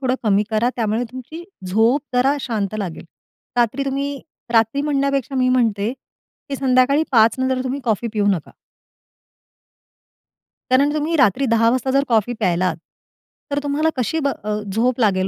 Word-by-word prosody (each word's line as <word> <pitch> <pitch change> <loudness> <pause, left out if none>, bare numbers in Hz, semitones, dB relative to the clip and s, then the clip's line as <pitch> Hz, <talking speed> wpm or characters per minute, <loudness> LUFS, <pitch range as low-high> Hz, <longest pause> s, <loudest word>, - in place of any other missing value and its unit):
थोडं 255 -2 0
कमी 205 -1 +3
करा, 220 +3 +1
त्यामुळे 225 0 0
तुमची 260 +6 -8 0.2
झोप 225 +9 +3
जरा 265 +3 +3
शांत 215 -5 -2
लागेल, 185 -6 -5 0.5
रात्री 245 +3 +1
तुम्ही 275 +1 -3 0.3
रात्री 225 +4 +3
म्हणण्यापेक्षा 275 -2 0
मी 255 -1 +2
म्हणते, 230 -4 +1 0.6
की 275 - -3
संध्याकाळी 265 +2 +3
5 225 -1 +5
नंतर 260 0 0
तुम्ही 265 +2 -3
कॉफी 230 0 0
पिऊ 210 -2 0
नका. 175 -6 -3 2.2
कारण 280 +3 +4
तुम्ही 305 +2 -1
रात्री 260 0 +3
10 230 0 +4
वाजता 260 +2 0
जर 275 +1 +3
कॉफी 225 0 +2
प्यायलात 180 -1 +1 0.8
तर 285 - +1
तुम्हाला 290 +2 +1
कशी 255 +6 0
ब 280 - 0 0.2
अ, 210 0 -2
झोप 245 +4 +1
लागेल 190 -4 +2
250 Hz, 150 wpm, -20 LUFS, 215-275 Hz, 2.2 s, 5